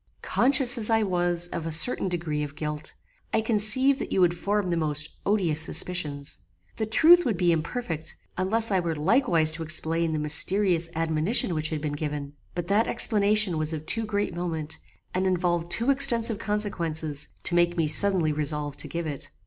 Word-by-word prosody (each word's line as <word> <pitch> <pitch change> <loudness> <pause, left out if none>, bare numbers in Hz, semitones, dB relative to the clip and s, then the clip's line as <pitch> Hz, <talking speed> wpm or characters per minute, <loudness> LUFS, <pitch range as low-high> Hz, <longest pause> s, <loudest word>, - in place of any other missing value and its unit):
Conscious 260 -1 +2
as 215 - +2
I 225 -1 +2
was 175 -2 +1
of 165 -2 -6
a - - -4
certain 185 +4 +1
degree 165 -4 -4
of 145 -1 -6
guilt, 150 0 -6 0.4
I - - +1
conceived 230 +5 +5
that - - -6
you - - -1
would 175 -1 +2
form 200 +1 -2
the - - 0
most 155 -2 -1 0.2
odious 180 -7 +1
suspicions. 150 -4 +1 0.4
The 220 - -3
truth 335 +10 +5
would 225 -8 -2
be 175 0 +1
imperfect, 165 0 -4 0.2
unless 220 +5 -1
I 190 - +1
were 170 -2 -3
likewise 165 - +2
to 165 +1 -8
explain 160 +1 0
the 155 - -2
mysterious 165 +3 +4
admonition 165 +5 +1
which 155 -1 -1
had 155 -2 -5
been 150 -1 -4
given; 145 -1 -6 0.2
but 175 -1 -5
that 210 +3 +1
explanation 210 -6 +2
was 155 +1 -1
of 155 -1 -7
too 225 +5 -1
great 205 -1 -3
moment, 160 -3 -5 0.3
and 185 +1 -1
involved 175 -2 -1
too 230 +10 0
extensive 235 -6 +4
consequences 165 -9 -2 0.2
to - - +3
make 175 0 +1
me 165 -2 0
suddenly 175 0 +2
resolve 150 -1 -2
to - - -3
give 170 0 -5
it. 145 -3 -7
175 Hz, 180 wpm, -25 LUFS, 155-210 Hz, 0.4 s, conceived